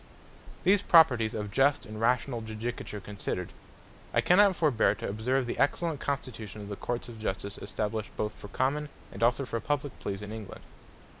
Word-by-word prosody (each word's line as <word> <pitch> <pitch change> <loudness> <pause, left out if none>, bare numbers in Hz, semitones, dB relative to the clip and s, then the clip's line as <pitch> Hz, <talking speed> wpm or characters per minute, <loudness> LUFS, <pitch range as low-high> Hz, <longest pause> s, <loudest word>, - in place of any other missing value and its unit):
These 195 +2 +5
properties 130 - +5
of 105 -2 -3
just 140 +5 +3
and 110 0 -7
rationall 120 +1 +1
Judicature 110 -1 -5
considered, 100 -3 -4 0.6
I - - +5
cannot 195 +1 +5
forbeare 150 -9 +3
to - - -5
observe 125 +6 0
the 120 - -4
excellent 155 +1 +1
constitution 115 -7 -4
of 100 - -8
the 100 - -3
Courts 120 +4 -3
of 115 -2 -9
Justice, 100 -1 -3
established 110 0 -3
both 105 0 -1
for - - -11
Common, 145 +7 0 0.2
and - - -9
also 120 +4 +3
for 115 -2 -2
Publique 145 +3 -2
Pleas 100 0 -4
in 105 - -7
England. 110 -3 -8
115 Hz, 170 wpm, -29 LUFS, 105-140 Hz, 0.6 s, These